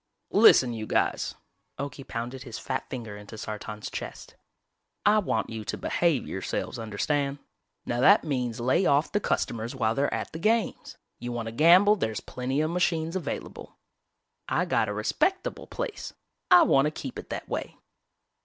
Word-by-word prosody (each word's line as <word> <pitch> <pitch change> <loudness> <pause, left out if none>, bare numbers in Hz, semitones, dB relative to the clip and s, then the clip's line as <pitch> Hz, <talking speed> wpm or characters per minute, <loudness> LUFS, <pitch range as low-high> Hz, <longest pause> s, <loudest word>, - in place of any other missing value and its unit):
"Listen, 125 -2 +7
you 110 -1 -5
guys," - - 0 0.4
Okie 140 0 -6
pounded 120 +2 -5
his 120 -4 -7
fat 130 -1 -4
finger 115 -5 -6
into 105 +2 -10
Sartan's 105 0 -6
chest. - - -7 0.7
"I 210 +1 +6
want 115 - -1
you 110 -1 -5
to - - -3
behave 170 -7 +1
yourselves, 95 +4 -3
understand? 140 +6 -1 0.5
Now 120 - -2
that 200 +9 +6
means 125 -6 -2
lay 130 +10 +2
off 145 +2 +3
the 205 - +1
customers 115 - -2
while 110 0 +1
they're 140 +3 0
at - - -3
the 160 - -6
games. 220 +4 0 0.2
You 120 +1 -5
wanna 115 -1 -4
gamble 180 - +6
there 110 - -1
is 110 - -4
plenty 130 +3 -2
of 155 +1 0
machines 170 -1 0
available. 160 -6 -5 0.7
I - - +1
got - - +1
a - - -2
respectable 385 +6 -1
place, - - -5 0.4
I 360 -2 +8
wanna 145 - +4
keep 140 -4 -7
it - - -10
that - - -5
way!" - - -4
135 Hz, 165 wpm, -27 LUFS, 115-170 Hz, 0.7 s, I